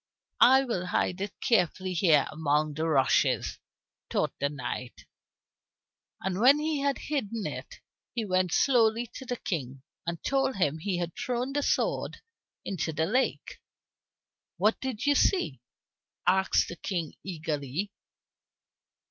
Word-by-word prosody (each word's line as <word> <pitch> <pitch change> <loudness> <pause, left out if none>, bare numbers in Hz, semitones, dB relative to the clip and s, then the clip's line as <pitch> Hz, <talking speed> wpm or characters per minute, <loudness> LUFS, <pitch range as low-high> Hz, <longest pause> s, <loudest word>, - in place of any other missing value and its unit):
"I 265 +2 +7
will 190 -9 -2
hide 180 +1 0
it 200 0 -5
carefully 185 - +1
here 160 -5 +4
among 155 -1 +1
the 160 +2 -1
rushes," 140 -4 +2 0.5
thought - - 0
the 140 - +1
knight. 125 -3 -6 1.2
And 190 0 -2
when 265 +6 +7
he 305 -1 -1
had 280 0 +1
hidden 230 -7 -3
it, - - -6 0.3
he 230 -3 -1
went 185 -2 +1
slowly 235 - +3
to 260 - -9
the 250 - -1
King 135 - -4 0.2
and 170 0 -1
told 270 -2 +1
him 160 -4 0
he 185 +2 -1
had 170 -1 -3
thrown 255 0 -2
the 290 - +1
sword - - 0 0.5
into 165 -4 -2
the 160 +1 0
lake. 250 +9 -1 1.0
"What 210 +5 +2
did 260 -3 -3
you 290 - +5
see?" 275 - +2 0.6
asked 190 +2 +3
the 175 - -7
King 170 -5 -3
eagerly. 160 +1 -3
190 Hz, 135 wpm, -28 LUFS, 160-250 Hz, 1.2 s, I